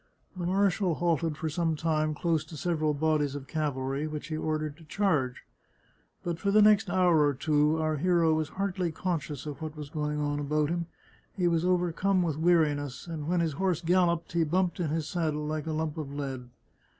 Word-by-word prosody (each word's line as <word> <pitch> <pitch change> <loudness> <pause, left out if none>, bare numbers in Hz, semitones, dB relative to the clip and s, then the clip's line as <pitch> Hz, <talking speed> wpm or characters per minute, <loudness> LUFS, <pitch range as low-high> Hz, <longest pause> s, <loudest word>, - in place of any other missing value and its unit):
The 175 -2 -3
marshal 190 -2 +2
halted 165 -2 0
for 160 - -3
some 160 +1 0
time 155 -1 0
close 165 -1 0
to 155 - -10
several 155 -2 0
bodies 150 -2 +1
of 140 -2 -6
cavalry, 140 -1 -2
which 155 0 -6
he 155 - -2
ordered 155 -1 -2
to 165 - -15
charge. 155 -10 0 0.8
But 170 -1 -3
for 200 - 0
the 210 +2 +5
next 210 -1 +5
hour 175 -4 +4
or 145 -1 +2
two 150 +2 +2
our 155 -1 0
hero 170 0 +3
was 155 -1 -1
hardly 185 -2 -2
conscious 155 -6 -3
of 150 0 -6
what 155 -1 -6
was 150 -1 -7
going 150 -1 -2
on 145 0 -1
about 150 +1 0
him; 170 -1 -2 0.5
he 180 -2 +2
was 165 -1 +2
overcome 180 +1 +2
with 160 -4 -1
weariness, 150 -5 +1
and 160 -3 -5
when 175 0 +2
his 160 -3 0
horse 180 +1 0
galloped 170 -1 +2
he 170 -1 +2
bumped 180 +3 0
in 170 -4 0
his 155 0 -1
saddle 155 -4 -1
like 155 0 -3
a - - -1
lump 155 0 -2
of 145 -3 -5
lead. 135 -3 -5
160 Hz, 200 wpm, -29 LUFS, 150-175 Hz, 0.8 s, the